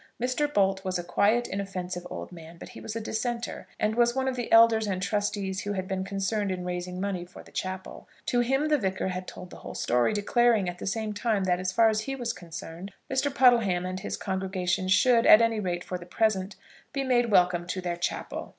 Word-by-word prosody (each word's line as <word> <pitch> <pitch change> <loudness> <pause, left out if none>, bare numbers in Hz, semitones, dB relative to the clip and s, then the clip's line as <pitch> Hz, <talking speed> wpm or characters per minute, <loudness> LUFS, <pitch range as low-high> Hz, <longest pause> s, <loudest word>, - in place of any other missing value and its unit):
Mr. 255 +5 0
Bolt 195 -4 +2
was 185 -1 -1
a 175 - -4
quiet, 210 +7 +2
inoffensive 185 -2 -4
old - - -7
man, 165 -1 -11
but - - -10
he - - -11
was 220 - -6
a - - -1
dissenter, 235 +2 -3
and 215 0 +1
was 240 +1 +3
one 265 0 0
of 260 - 0
the 245 -2 -4
elders 225 -1 +6
and 190 -2 -1
trustees 200 -1 -1
who 205 - -3
had 190 -1 -3
been 190 -1 -2
concerned 200 +1 -1
in 180 -1 -3
raising 180 0 -4
money 190 -2 -2
for 175 +1 -13
the - - -18
chapel. 185 0 -6 0.2
To 245 - +1
him 270 +5 +1
the 300 -1 +3
Vicar 190 -2 -1
had 185 0 -5
told 180 0 -9
the - - -10
whole - - -9
story, 120 - +2
declaring 220 0 +2
at 175 0 -5
the - - -5
same 215 +1 -2
time 210 -1 0
that, 180 -1 +1
as 185 0 -1
far 225 +3 +4
as 215 -1 +2
he 270 +4 -4
was 245 -3 -3
concerned, 170 +2 -8 0.2
Mr. 265 +2 +1
Puddleham 235 -10 +4
and 185 0 -4
his 200 - -4
congregation 190 -1 -2
should, 230 +5 +4
at 215 - +10
any 230 -1 +2
rate 175 -3 -2
for 180 - -5
the 175 - -11
present, 195 -1 0 0.4
be 275 - -1
made 245 -2 +2
welcome 180 -3 +3
to 185 - -3
their 175 -1 -2
chapel. 175 - -4
195 Hz, 225 wpm, -27 LUFS, 185-230 Hz, 0.4 s, at